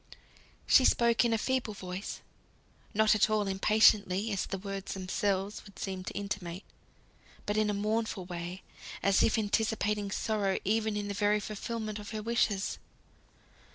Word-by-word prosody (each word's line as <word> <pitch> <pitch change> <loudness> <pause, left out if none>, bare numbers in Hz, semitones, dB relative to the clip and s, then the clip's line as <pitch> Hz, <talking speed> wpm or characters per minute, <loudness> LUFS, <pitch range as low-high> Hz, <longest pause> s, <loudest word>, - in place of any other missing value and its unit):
She 260 - +6
spoke 235 -2 +4
in 235 - +2
a 225 - +3
feeble 240 -2 -1
voice; 185 +1 -6 0.7
not 220 0 +4
at 215 0 +3
all 215 -1 +1
impatiently, 200 +1 +3
as 195 - -1
the 195 - -3
words 195 0 -5
themselves 195 +1 -1
would 200 - -15
seem 190 -1 -4
to - - -5
intimate, 195 -3 -4 0.8
but 205 - -1
in 215 -1 +2
a - - +1
mournful 215 -2 -1
way, 175 +1 -6 0.4
as 200 -1 +4
if - - +3
anticipating 210 -1 0
sorrow 200 -1 0
even 215 +1 +1
in 205 0 -3
the 200 - -3
very 210 +1 +2
fulfilment 215 +1 -4
of 205 - -8
her 215 -1 -5
wishes. 220 -3 0
205 Hz, 155 wpm, -31 LUFS, 195-220 Hz, 0.8 s, She